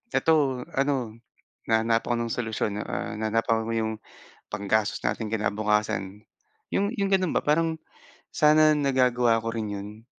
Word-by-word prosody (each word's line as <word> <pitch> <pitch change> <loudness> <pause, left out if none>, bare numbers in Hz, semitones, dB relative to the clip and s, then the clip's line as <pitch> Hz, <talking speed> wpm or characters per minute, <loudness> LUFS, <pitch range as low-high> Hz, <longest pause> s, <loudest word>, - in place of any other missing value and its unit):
eto 140 -6 +2
ano, 135 -5 0 0.5
na 110 0 +3
nahanapan 115 +1 +1
ko 120 - +2
ng 115 - -5
solusyon 110 -3 -2
ah, - - -4
nahanapan 110 +1 0
ko - - -2
'yong, 110 -1 -1 0.6
panggastos 105 +1 0
nating 105 +1 -1
kinabukasan. 105 -1 -1 0.5
'Yong 200 +4 0
'yong 200 0 0
gano'n 185 -3 +2
ba, - - +3
parang 160 +2 +2 0.6
sana 155 0 +5
nagagawa 125 -4 +2
ko 115 - -4
rin 110 -2 -3
'yon. 105 +2 -8
115 Hz, 140 wpm, -26 LUFS, 110-140 Hz, 0.6 s, sana